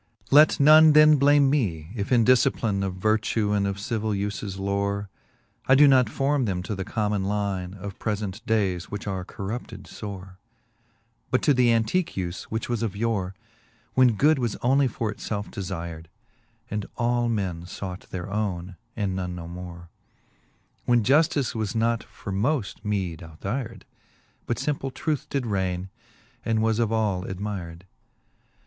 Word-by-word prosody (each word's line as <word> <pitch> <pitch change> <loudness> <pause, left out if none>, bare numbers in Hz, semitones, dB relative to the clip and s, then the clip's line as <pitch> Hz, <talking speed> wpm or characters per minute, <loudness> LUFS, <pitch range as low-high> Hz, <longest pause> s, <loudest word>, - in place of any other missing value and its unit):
III. 110 -2 -40
Let 150 +1 +7
none 155 +2 +8
then 155 0 +7
blame 140 0 +5
me, 95 - -1
if 100 0 -4
in 120 -3 +4
dilcipline 110 -5 +2
Of 95 -1 -2
vertue 110 +1 +1
and 100 -1 +1
of 100 0 -3
civill 110 +1 -2
ufes 100 -1 -3
lore, 100 0 -2 0.6
I 130 - +6
doe 145 +2 +7
not 130 -5 +5
forme 135 +2 +1
them 90 -4 -2
to 100 - -4
the 95 -1 -3
common 105 -1 -1
line 100 -2 -2
Of 100 0 -8
prelent 105 -1 -3
dayes, 95 -5 0
which 100 -1 -6
are 95 -2 -3
corrupted 100 +5 -7
(ore, 95 -3 -8 0.5
' 115 -1 -42
But 130 +1 +1
to 145 - +5
the 125 -2 +4
antique 115 +11 +1
ufe, 90 -1 -4
which 110 +1 -4
was 120 -2 -2
of 110 -4 -2
yore, 100 -4 -1 0.6
When 125 -3 +4
good 150 +6 +4
was 120 -4 -1
onely 135 +2 +4
for 115 -2 -3
it - - -11
felfe 105 -1 -4
defyred, 85 -5 -6 0.6
And 105 -1 -3
all 120 0 +1
men 95 -6 -2
fought 90 0 -7
their 90 -2 -5
owne, 95 -3 -3 0.2
and 100 -3 -1
none 90 -1 -3
no 85 -1 -7
more; 85 -1 -9 1.0
When 120 -2 +3
Juftice 145 - +3
was 110 -2 -3
not 115 0 +1
for 100 - -8
moft 110 +2 -1
meed 95 -6 -2
out 80 -1 -13
hyred. 115 +3 -4 0.6
But 120 - -1
fimple 140 -2 -2
truth 150 +2 -2
did 135 -3 -1
rayne, 95 -3 -2 0.5
and 110 -1 +1
was 110 0 +1
of 115 -2 +1
all 105 -5 0
admyred. 95 -3 -5
105 Hz, 165 wpm, -25 LUFS, 95-120 Hz, 1.0 s, none